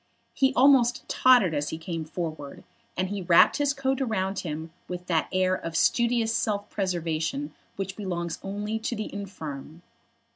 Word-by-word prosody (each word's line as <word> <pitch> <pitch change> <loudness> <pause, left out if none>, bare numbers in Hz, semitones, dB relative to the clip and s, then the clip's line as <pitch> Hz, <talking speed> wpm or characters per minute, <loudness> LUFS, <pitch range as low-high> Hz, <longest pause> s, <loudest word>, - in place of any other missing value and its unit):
He 265 -1 +3
almost 255 -2 +4
tottered 245 -10 +5
as 145 -1 -1
he 160 - -4
came 165 -1 -5
forward, 155 -3 -6 0.3
and 185 +1 0
he 200 -1 -3
wrapped 170 -1 +5
his 290 -1 +2
coat 270 -1 -1
around 195 -6 -1
him 160 -1 -5 0.2
with 180 0 -6
that 165 -3 0
air 185 0 +2
of 165 -3 -4
studious 235 +1 +2
self 205 -2 -1
preservation 175 - -2 0.2
which 195 -1 -4
belongs 170 -5 -3
only 205 +3 -3
to 230 +2 -3
the 215 -1 -5
infirm. 165 -5 -7
190 Hz, 155 wpm, -26 LUFS, 165-230 Hz, 0.3 s, tottered